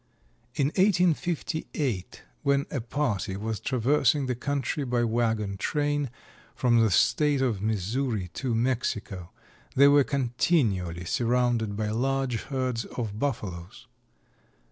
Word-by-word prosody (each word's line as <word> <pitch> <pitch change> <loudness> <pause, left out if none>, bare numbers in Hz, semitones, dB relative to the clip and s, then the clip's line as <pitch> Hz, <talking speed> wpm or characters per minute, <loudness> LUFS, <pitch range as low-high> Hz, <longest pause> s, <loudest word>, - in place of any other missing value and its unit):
In 140 -1 +2
1858, 165 - 0 0.2
when 140 0 +2
a 135 - -2
party 115 -6 -2
was 110 0 -3
traversing 135 +3 +2
the 130 - -1
country 140 +3 -2
by 120 -2 0
wagon 110 -3 0
train 145 +4 0 0.5
from 120 -2 +3
the 110 -1 +4
state 145 - +3
of 120 -7 0
Missouri 110 0 -1
to 125 +1 -2
Mexico, 110 -7 -2 0.5
they 140 +2 +7
were 145 0 +6
continually 120 - 0
surrounded 120 -1 +1
by 110 -1 -1
large 130 +1 0
herds 130 -4 -2
of 110 -4 -5
Buffaloes. 100 -10 -4
125 Hz, 115 wpm, -27 LUFS, 110-140 Hz, 0.5 s, they